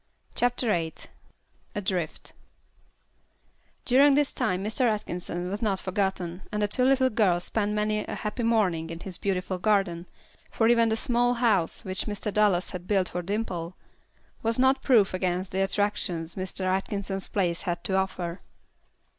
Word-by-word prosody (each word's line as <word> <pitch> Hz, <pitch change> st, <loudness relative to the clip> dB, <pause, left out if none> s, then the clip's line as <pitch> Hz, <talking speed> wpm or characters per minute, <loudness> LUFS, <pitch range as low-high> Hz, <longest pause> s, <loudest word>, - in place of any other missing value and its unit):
CHAPTER 245 Hz, +1 st, +1 dB
VIII 165 Hz, -5 st, 0 dB, 0.8 s
Adrift 185 Hz, -5 st, -3 dB, 1.5 s
During 275 Hz, +3 st, +6 dB
this 290 Hz, -1 st, +2 dB
time 185 Hz, +1 st, -1 dB
Mr. 230 Hz, +4 st, +1 dB
Atkinson 180 Hz, -3 st, -3 dB
was 200 Hz, +3 st, -3 dB
not 200 Hz, -4 st, 0 dB
forgotten, 185 Hz, -2 st, -2 dB
and 210 Hz, -, -2 dB
the 210 Hz, -, +2 dB
two 250 Hz, +5 st, 0 dB
little 260 Hz, -1 st, +4 dB
girls 185 Hz, -6 st, +2 dB
spent 210 Hz, +1 st, 0 dB
many 210 Hz, 0 st, 0 dB
a -, -, -5 dB
happy 210 Hz, +3 st, -4 dB
morning 195 Hz, -9 st, +1 dB
in 165 Hz, 0 st, -7 dB
his 185 Hz, -2 st, -7 dB
beautiful 185 Hz, -1 st, -2 dB
garden, 190 Hz, -4 st, +1 dB, 0.4 s
for 225 Hz, -, +1 dB
even 230 Hz, -1 st, +4 dB
the 220 Hz, -, +1 dB
small 245 Hz, +2 st, +1 dB
house 215 Hz, -8 st, +1 dB
which 190 Hz, +2 st, -3 dB
Mr. 205 Hz, 0 st, -3 dB
Dallas 205 Hz, -4 st, +2 dB
had 180 Hz, -1 st, -7 dB
built 195 Hz, -3 st, +2 dB
for 180 Hz, -, -3 dB
Dimple, 180 Hz, -3 st, -3 dB, 0.6 s
was 225 Hz, 0 st, 0 dB
not 265 Hz, +1 st, +3 dB
proof 220 Hz, -8 st, +4 dB
against 185 Hz, 0 st, -1 dB
the 190 Hz, -, 0 dB
attractions 190 Hz, -4 st, -1 dB
Mr. 185 Hz, 0 st, -5 dB
Atkinson's 195 Hz, 0 st, -2 dB
place 175 Hz, -4 st, -1 dB
had 175 Hz, -1 st, -3 dB
to 190 Hz, -, -2 dB
offer. 185 Hz, -2 st, -2 dB
195 Hz, 155 wpm, -27 LUFS, 180-220 Hz, 1.5 s, During